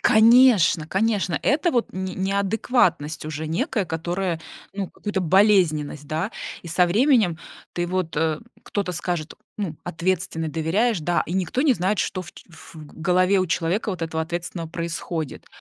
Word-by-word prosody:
Конечно, 225 -8 +5
конечно, 195 -2 0
это 310 +5 +2
вот 240 -2 0
н 190 +1 -4
не 185 - -4
неадекватность 190 - 0
уже 155 0 -4
некая, 205 - -1
которая, 170 +1 -2 0.3
ну, 195 -2 -4
как - - -25
будто 205 -2 0
болезненность, 165 -6 +3
да, 160 +8 -2 0.3
и 170 - -9
со 175 +2 +3
временем 215 - +3 0.3
ты 175 0 -2
вот, 180 -3 -2
э 160 0 0 0.2
кто-то 200 -3 -2
скажет: 175 -2 -3 0.2
"Ну, 175 -7 -3
ответственный"- 175 -1 -2
доверяешь, 175 - +1
да, 175 +3 +1
и 170 - -5
никто 190 - 0
не 295 - +5
знает, 190 +1 0
что 185 - -1
в - - -12
ч - - -15
в 165 0 -15
голове 180 +5 +1
у 185 - 0
человека 180 +6 0
вот 180 -3 -5
этого 160 0 -2
ответственного 170 0 -5
происходит. 165 -2 -4
180 Hz, 160 wpm, -23 LUFS, 165-200 Hz, 0.3 s, Конечно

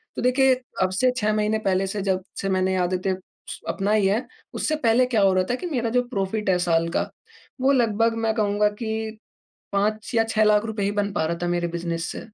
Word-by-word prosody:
तो - - -3
देखिए 260 +1 +4 0.3
अब 185 - +2
से 255 +1 +4
6 215 -3 +1
महीने 215 0 +1
पहले 195 -2 0
से 200 +1 -3
जब 190 -1 0 0.2
से 195 - -2
मैंने 185 0 +1
ये - - 0
आदतें 185 +1 0 0.4
स - - -6
अपनाई 205 +1 +1
है, 215 +6 0 0.3
उससे 310 - 0
पहले 250 -3 +3
क्या 230 -4 +1
हो 195 -1 +4
रहा 185 0 +2
था 245 - +1
कि 360 - -7
मेरा 240 -6 -1
जो 250 +1 +3
प्रॉफिट 200 -1 -2
है 185 - +4
साल 165 -1 +2
का - - 0 0.6
वो 270 +2 +4
लगभग 230 -3 +2
मैं 220 -1 +2
कहूँगा 210 -1 +2
कि 220 -1 -3 0.6
5 215 +3 0
या 225 - +4
6 220 -1 +2
लाख़ 210 0 +4
रुपये 220 -3 -2
ही 200 - +1
बन 205 0 -1
पा 160 - 0
रहा 170 +1 -2
था - - 0
मेरे 175 0 0
बिज़नेस 170 -1 -3
से। - - -6
210 Hz, 230 wpm, -24 LUFS, 190-225 Hz, 0.6 s, देखिए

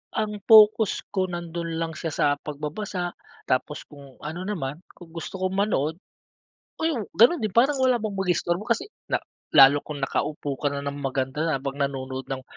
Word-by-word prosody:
ang 210 -1 -2
focus 220 -1 +6
ko 190 -1 0
nandun 170 -1 -4
lang 165 0 -2
siya 160 -1 -5
sa - - +2
pagbabasa, 175 +5 -4 0.3
tapos 140 +3 -1
kung 140 -3 -15
ano 175 +5 -5
naman 155 -7 -3 0.2
kung 170 -2 -14
gusto 165 +3 -7
ko 185 0 -1
manood, 185 -5 0 0.8
oh 285 - 0
ganun 250 +9 +7
din 210 -3 -2
parang 265 +4 +4
wala 255 -2 +4
bang 205 -2 -3
mag-istorbo 180 +2 0
kasi 230 - -1 0.2
na - - +2 0.4
lalo 140 0 +8
kung 145 -2 -6
nakaupo 145 0 -2
ka 145 - +1
na 140 - -4
ng 140 0 -3
maganda 135 +3 -1
na 160 - +1
habang 140 +1 -5
nanonood 135 -1 -3
ng 130 -1 -3
165 Hz, 170 wpm, -25 LUFS, 140-205 Hz, 0.8 s, lalo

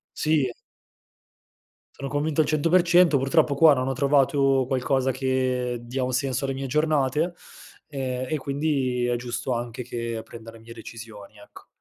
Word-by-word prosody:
Sì. 155 -3 +1 1.4
Sono 140 - -6
convinto 150 +2 0
al 155 - 0
100%. 170 +1 +4
Purtroppo 140 +2 +2
qua 155 +1 +7
non 130 0 -1
ho 135 - 0
trovato 135 0 +2
qualcosa 130 0 0
che 130 -1 -1
dia 125 +2 -4
un 130 0 -2
senso 135 0 -1
alle 135 - -2
mie 135 0 -5
giornate, 150 +3 +1 0.5
ehm, 130 -3 -4
e 155 - 0
quindi 135 -3 -1
è 120 0 0
giusto 125 +1 -3
anche 120 +1 -4
che 115 -1 -4
prenda 115 0 -11
le 115 - -15
mie 115 +1 -12
decisioni, 110 -2 -11
ecco. 100 - -15
130 Hz, 150 wpm, -24 LUFS, 120-145 Hz, 1.4 s, qua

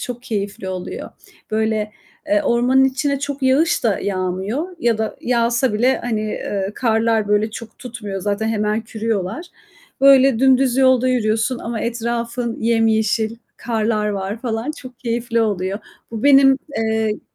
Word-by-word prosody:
çok 245 -1 -6
keyifli 205 -3 -4
oluyor. 185 -1 -6 0.4
Böyle, 215 -1 0 0.4
eee, 310 0 +3
ormanın 255 0 +3
içine 275 +1 0
çok 285 0 -5
yağış 270 +3 +2
da 215 -4 +2
yağmıyor 200 - -3
ya 235 -6 +1
da 220 0 -2
yağsa 235 0 +1
bile, 245 +5 +2
hani, 230 -3 -2
eee, 205 -2 -3
karlar 225 -2 +1
böyle 210 +1 +2
çok 220 0 -10
tutmuyor. 215 -6 -6
Zaten 205 +3 -1
hemen 215 0 0
kürüyorlar. 220 - -3 0.5
Böyle, 270 -3 +6
dümdüz 265 -1 +4
yolda 260 -1 +4
yürüyorsun 225 0 0
ama 230 -1 -4
etrafın 235 0 -2
yemyeşil, 225 -1 +1 0.2
karlar 220 -2 -1
var 200 +2 -3
falan. 230 +2 -2
Çok 255 -5 -11
keyifli 235 -1 -1
oluyor. 200 -2 -1 0.3
Bu 225 -1 -5
benim, 270 -1 +6 0.2
eee 220 -1 0
230 Hz, 140 wpm, -20 LUFS, 215-255 Hz, 0.5 s, Böyle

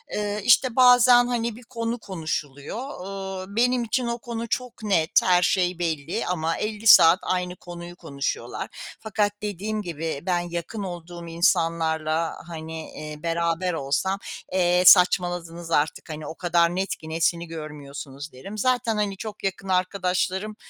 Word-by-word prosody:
Iıı, 210 0 -2
işte, 245 +3 +4
bazen, 245 -1 +7
hani, 235 -2 -1
bir 245 - -13
konu 235 0 -4
konuşuluyor. 155 -5 -5 0.3
Iıı, 195 0 -6
benim 245 +1 +2
için 235 +2 -1
o 235 0 -1
konu 235 -1 -5
çok 245 -1 -4
net, 175 -6 +1
her 180 -1 +4
şey 180 -1 +1
belli 160 -2 -2
ama 165 -2 -1
50 215 +1 -3
saat 165 -2 +8
aynı 180 -1 -2
konuyu 175 -1 -9
konuşuyorlar. 140 -5 -4 0.3
Fakat 210 -1 0
dediğim 210 +1 -3
gibi 165 -4 -4
ben 180 -1 +1
yakın 175 +4 -5
olduğum 175 -2 -7
insanlarla, 165 -1 +1
hani, 160 -1 -7
iii, 150 0 -8
beraber 170 +2 0
olsam, 165 +7 -1 0.3
"E, 180 -1 +2
saçmaladınız 175 -2 +4
artık, 150 +1 0
hani, 155 -1 -6
o 160 - -7
kadar 170 0 +2
net 190 +1 -1
ki, 160 - -11
nesini 170 +1 0
görmüyorsunuz?" 145 -2 -8
derim. 195 +12 -9
Zaten, 245 0 +1
hani, 205 -2 -1
çok 210 +1 -8
yakın 195 0 -3
arkadaşlarım, 185 +2 0
180 Hz, 145 wpm, -24 LUFS, 165-210 Hz, 0.3 s, saat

